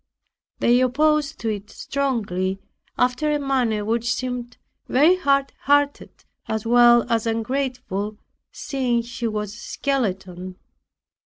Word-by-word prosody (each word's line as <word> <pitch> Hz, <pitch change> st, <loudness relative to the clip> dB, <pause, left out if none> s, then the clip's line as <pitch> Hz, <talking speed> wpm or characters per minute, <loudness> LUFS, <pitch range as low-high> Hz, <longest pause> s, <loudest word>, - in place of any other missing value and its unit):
They 245 Hz, +1 st, +3 dB
opposed 295 Hz, +1 st, +1 dB
it 210 Hz, -1 st, -3 dB
strongly, 210 Hz, -9 st, -2 dB, 0.4 s
after 250 Hz, +5 st, +1 dB
a 295 Hz, -, +2 dB
manner 250 Hz, -7 st, 0 dB
which 235 Hz, +2 st, 0 dB
seemed 245 Hz, -1 st, -4 dB, 0.3 s
very 305 Hz, +8 st, +5 dB
hard 275 Hz, -5 st, +1 dB
hearted 285 Hz, 0 st, +1 dB, 0.2 s
as 220 Hz, 0 st, -2 dB
well 240 Hz, 0 st, +6 dB
as 230 Hz, 0 st, 0 dB
ungrateful, 225 Hz, -3 st, -2 dB, 0.3 s
seeing 255 Hz, -5 st, -1 dB
she 235 Hz, 0 st, -4 dB
was 210 Hz, -2 st, -3 dB
a -, -, -11 dB
skeleton. 190 Hz, -10 st, -3 dB
240 Hz, 110 wpm, -23 LUFS, 215-275 Hz, 0.4 s, well